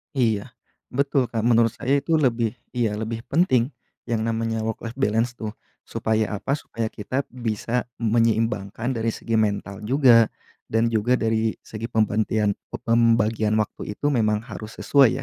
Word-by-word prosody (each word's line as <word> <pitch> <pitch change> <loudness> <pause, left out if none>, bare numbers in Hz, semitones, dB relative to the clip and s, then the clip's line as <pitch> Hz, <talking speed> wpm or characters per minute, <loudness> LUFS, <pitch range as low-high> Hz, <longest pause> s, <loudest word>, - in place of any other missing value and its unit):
Iya. 110 -6 0 0.3
Betul, 135 -1 +1
Kak. 115 -2 -2
Menurut 115 -1 +4
saya 135 +2 +1
itu 160 +4 0
lebih 120 -6 +1 0.2
iya 115 -4 0
lebih 110 +1 -3
penting, 135 -7 +3 0.4
yang 115 -2 0
namanya 115 0 -1
work 110 0 -3
life 115 +1 -6
balance 120 -1 +1
tuh. 110 -3 -5 0.3
Supaya 110 -1 -1
apa? 140 - 0
Supaya 115 -6 -4
kita 130 +6 -3
bisa 120 0 -2 0.2
menyeimbangkan 115 0 +1
dari 115 0 0
segi 115 +1 -3
mental 100 -2 -1
juga, 120 -2 +5 0.4
dan 115 +1 +3
juga 115 +3 +2
dari 110 0 +1
segi 110 +1 -6
pembantian 110 -1 +1 0.2
pembagian 115 -2 +2
waktu 105 -1 -3
itu 145 - -1
memang 110 -4 +1
harus 110 0 -8
sesuai 140 -4 +5
115 Hz, 145 wpm, -24 LUFS, 110-120 Hz, 0.4 s, juga